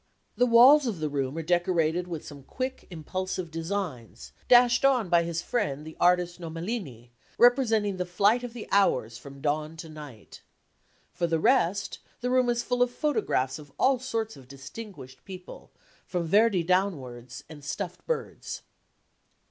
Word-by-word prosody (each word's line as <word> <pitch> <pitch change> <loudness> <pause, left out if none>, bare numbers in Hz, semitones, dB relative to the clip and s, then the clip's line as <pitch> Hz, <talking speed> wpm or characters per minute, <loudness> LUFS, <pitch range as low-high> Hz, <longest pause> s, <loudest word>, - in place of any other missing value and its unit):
The 245 - +3
walls 255 +5 +7
of 205 -8 -3
the 155 -1 -1
room 140 0 -2
are 165 - -3
decorated 175 0 +1
with 165 -4 -6
some 145 -2 -10
quick 255 - -5
impulsive 185 +1 -4
designs, 165 - -5 0.2
dashed 245 0 +6
on 255 -8 +3
by 170 0 +5
his 170 0 -3
friend 150 - -2
the 160 - -9
artist 180 0 +2
Nomellini, 165 - -6 0.3
representing 225 -5 +3
the 180 - -2
flight 205 +7 +2
of 245 -2 -6
the 235 -3 -8
hours 125 - +2
from 140 +1 -12
dawn 155 +2 -2
to 165 -1 -8
night. 145 -8 -11 0.7
For 175 -1 -1
the 165 -1 +1
rest, 200 -2 +1 0.2
the 250 +1 -2
room 255 -1 +3
is 240 0 0
full 245 0 -1
of 245 - +4
photographs 245 - -1
of 145 -2 -13
all 265 -1 +3
sorts 225 -4 -3
of 130 -2 -15
distinguished 135 - -10
people, 185 -2 -11 0.4
from 175 -2 -2
Verdi 205 +1 +3
downwards, 130 -10 -2
and 150 -2 -12
stuffed 180 +4 -5
birds. 485 - -4
180 Hz, 155 wpm, -27 LUFS, 150-230 Hz, 0.7 s, walls